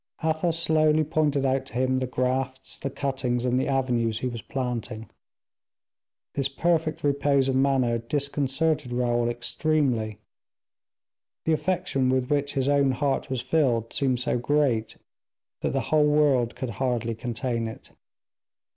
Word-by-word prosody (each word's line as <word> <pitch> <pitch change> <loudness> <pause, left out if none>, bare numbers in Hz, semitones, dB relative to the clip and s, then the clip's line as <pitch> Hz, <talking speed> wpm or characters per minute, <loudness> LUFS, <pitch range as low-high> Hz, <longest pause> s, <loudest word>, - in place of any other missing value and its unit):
Athos 160 +1 +1
slowly 155 -1 +3
pointed 150 -2 +1
out 135 0 0
to - - -13
him 130 +1 +1
the 130 - -2
grafts, 130 +1 -2
the 135 - -3
cuttings, 130 -3 -1
and 125 0 +2
the - - -1
avenues 120 -5 0
he 130 - 0
was 120 -2 -5
planting. 120 -4 -4 1.3
This 135 -1 0
perfect 160 +2 0
repose 140 -1 +2
of 135 - +1
manner 130 -3 +2
disconcerted 140 +2 -1
Raoul 120 -1 +1
extremely; 120 -2 0 1.3
the 160 - +3
affection 165 -6 0
with 130 0 0
which 145 0 0
his 135 -1 +1
own 140 -2 +3
heart 140 +1 -1
was 130 -2 -1
filled 120 -8 +1
seemed 130 -3 +1
so 125 -1 0
great 125 -4 +1 0.6
that - - 0
the 135 - 0
whole 150 -1 +5
world 145 -5 +3
could 130 -3 -4
hardly 120 0 -1
contain 115 0 -3
it. 110 - -10
130 Hz, 140 wpm, -26 LUFS, 120-145 Hz, 1.3 s, whole